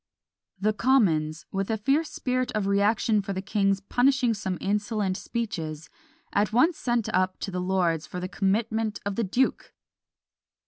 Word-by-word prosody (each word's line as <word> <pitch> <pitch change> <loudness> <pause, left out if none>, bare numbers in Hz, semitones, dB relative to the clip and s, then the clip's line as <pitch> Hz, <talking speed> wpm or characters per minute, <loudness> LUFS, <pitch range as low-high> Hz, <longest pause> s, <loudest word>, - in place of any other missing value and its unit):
The 215 +2 +1
commons, 170 -11 +2
with 195 +1 -2
a 220 - 0
fierce 280 +9 +1
spirit 255 0 -1
of 210 -2 0
reaction 205 +2 +2
for 195 0 -4
the 190 - -3
king's 195 -1 +1
"punishing 250 +3 +2
some 190 -3 -3
insolent 205 -1 -1
speeches," 165 -10 -4 0.4
at 205 0 +2
once 305 +9 +3
sent 240 -3 0
up 185 0 +1
to 195 - -3
the 180 0 -2
lords 180 -4 0
for 180 - -6
the 180 - -3
commitment 215 +3 0
of 200 -1 -2
the 230 - 0
duke! 245 +7 0
205 Hz, 155 wpm, -26 LUFS, 190-230 Hz, 0.4 s, once